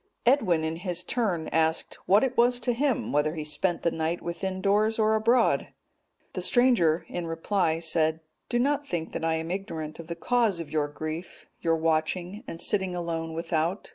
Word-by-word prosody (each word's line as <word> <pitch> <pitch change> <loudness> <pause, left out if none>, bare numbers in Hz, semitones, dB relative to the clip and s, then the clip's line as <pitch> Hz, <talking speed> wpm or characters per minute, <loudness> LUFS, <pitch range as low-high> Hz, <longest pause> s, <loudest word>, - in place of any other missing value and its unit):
Edwin, 215 - +3
in 160 +1 -2
his 180 0 -2
turn, 195 -10 -1
asked, 160 0 0
what 200 +5 +5
it 260 -1 0
was 245 +1 +4
to 245 +1 +1
him, 265 0 0
whether 150 +2 +1
he 155 - -3
spent 170 +3 -1
the 170 - +2
night 160 +2 -1
within 185 +2 -4
doors 210 +3 +2
or 220 -1 +3
abroad. 230 +2 +3 0.7
The - - -3
stranger, 180 -11 +3
in 175 -1 -4
reply, 165 0 0
said, 160 -1 +1 0.3
"Do 240 - +1
not 285 +3 +1
think 165 -6 -3
that - - -4
I 165 0 +1
am 160 +1 -3
ignorant 160 -5 -5
of 165 - -8
the 170 - -4
cause 225 0 +1
of 165 -3 -7
your 150 -2 +1
grief, 155 +4 -6 0.2
your 165 -1 +2
watching, 165 +5 -1
and 165 - -7
sitting 190 -1 +1
alone 165 -2 -3
without. 165 +3 -1
170 Hz, 185 wpm, -27 LUFS, 160-215 Hz, 0.7 s, what